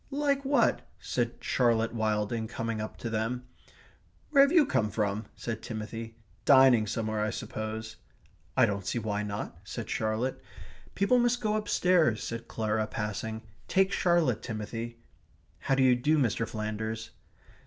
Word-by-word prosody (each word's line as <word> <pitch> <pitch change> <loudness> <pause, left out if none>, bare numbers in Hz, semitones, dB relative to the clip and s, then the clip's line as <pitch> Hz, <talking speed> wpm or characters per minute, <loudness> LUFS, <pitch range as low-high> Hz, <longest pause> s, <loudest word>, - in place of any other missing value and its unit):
"Like 280 -1 0
what?" 270 -3 +3 0.2
said 120 -1 -1
Charlotte 115 -2 +2
Wilding, 110 0 -1
coming 115 -1 -3
up 110 - -6
to 115 - -4
them. 115 +3 -2 0.9
"Where 280 -2 +7
have 280 +1 +6
you 330 -4 +6
come 115 - +1
from?" 105 0 -1
said 115 -2 -5
Timothy. 115 0 -6 0.3
"Dining 130 -5 +6
somewhere, 110 0 -1
I 110 - 0
suppose." 110 +1 -5 0.6
"I - - +7
don't 100 -1 -2
see 120 - -2
why 105 -2 -1
not," 105 -1 -5
said - - -6
Charlotte. 110 +4 -1 0.5
"People 200 +6 +3
must 240 0 +2
go 215 -3 0
downstairs," 180 - +2
said 115 0 -5
Clara, 110 -1 -1
passing. 110 +1 -4 0.2
"Take 190 +1 +3
Charlotte, 170 - +2
Timothy. 115 +1 -5 0.6
How 135 - +1
d'you 130 -1 +5
do, 150 +6 +2
Mr. 115 -4 +1
Flanders." 110 +1 -4
115 Hz, 145 wpm, -29 LUFS, 110-135 Hz, 0.9 s, Where